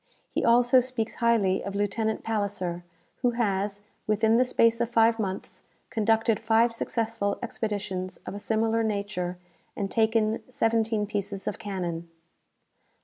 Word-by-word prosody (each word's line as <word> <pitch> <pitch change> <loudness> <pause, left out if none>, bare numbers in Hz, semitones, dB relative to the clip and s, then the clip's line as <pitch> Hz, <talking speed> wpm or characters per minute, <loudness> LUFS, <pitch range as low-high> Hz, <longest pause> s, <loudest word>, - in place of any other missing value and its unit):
He - - -1
also 245 +2 +5
speaks 250 -3 -2
highly 220 -5 +3
of 200 0 -5
Lieutenant 215 +2 -1
Palisser, 200 -5 -2 0.3
who 245 -1 +1
has, 200 -2 -1 0.2
within 220 +2 +3
the 250 - +5
space 230 -2 +3
of 235 - 0
five 230 -1 +4
months, 190 -3 -4 0.3
conducted 225 -1 +2
five 230 +1 +3
successful 225 -3 -2
expeditions 195 -4 -3
of - - -5
a 205 - -5
similar 225 +1 +1
nature, 200 -4 -2 0.4
and 195 -1 -3
taken 220 -1 +2
seventeen 225 -3 +1
pieces 200 -1 -4
of - - -3
cannon." 175 -5 -4
220 Hz, 135 wpm, -27 LUFS, 200-230 Hz, 0.4 s, also